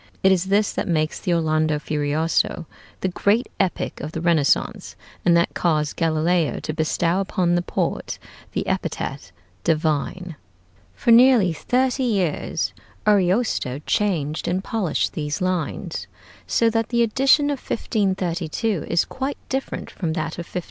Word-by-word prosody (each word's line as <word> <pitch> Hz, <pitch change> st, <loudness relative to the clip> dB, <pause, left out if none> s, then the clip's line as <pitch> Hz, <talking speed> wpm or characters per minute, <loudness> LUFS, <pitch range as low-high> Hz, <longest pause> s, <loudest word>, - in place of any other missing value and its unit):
It 190 Hz, -, +6 dB
is 185 Hz, -1 st, +2 dB
this 200 Hz, +2 st, +2 dB
that -, -, -2 dB
makes 155 Hz, -3 st, 0 dB
the 180 Hz, -, -2 dB
'Orlando 155 Hz, -2 st, +2 dB
Furioso' 150 Hz, +3 st, 0 dB, 0.4 s
the -, -, +1 dB
great 205 Hz, +6 st, +1 dB
epic 190 Hz, -2 st, -1 dB
of 155 Hz, +1 st, -6 dB
the -, -, -3 dB
Renaissance, 160 Hz, -4 st, +1 dB, 0.3 s
and 170 Hz, -1 st, +5 dB
that 170 Hz, -, +1 dB
caused 155 Hz, -4 st, 0 dB
Galileo 165 Hz, 0 st, +1 dB
to 155 Hz, -, -4 dB
bestow 165 Hz, +3 st, +1 dB
upon 185 Hz, -2 st, 0 dB
the 175 Hz, -, +2 dB
poet -, -, -2 dB, 0.4 s
the -, -, -1 dB
epithet -, -, -3 dB, 0.3 s
"divine." 160 Hz, +2 st, -1 dB, 0.6 s
For 235 Hz, -, +1 dB
nearly 235 Hz, -7 st, +6 dB
thirty 255 Hz, -, 0 dB
years 195 Hz, -, 0 dB, 0.3 s
Ariosto 190 Hz, -, +2 dB
changed 165 Hz, -8 st, 0 dB
and 185 Hz, +2 st, 0 dB
polished 205 Hz, -8 st, -1 dB
these 150 Hz, -1 st, -3 dB
lines, 185 Hz, -3 st, -2 dB, 0.4 s
so 230 Hz, -, +3 dB
that 225 Hz, 0 st, 0 dB
the 235 Hz, -1 st, +3 dB
edition 270 Hz, +6 st, +3 dB
of 280 Hz, -, -3 dB
1532 190 Hz, -3 st, -1 dB
is 170 Hz, -, +2 dB
quite 270 Hz, +2 st, -4 dB
different 265 Hz, 0 st, -3 dB
from 165 Hz, -4 st, -3 dB
that 160 Hz, +1 st, -3 dB
of 170 Hz, -, -6 dB
1516. 180 Hz, -, -2 dB
175 Hz, 140 wpm, -22 LUFS, 160-210 Hz, 0.6 s, It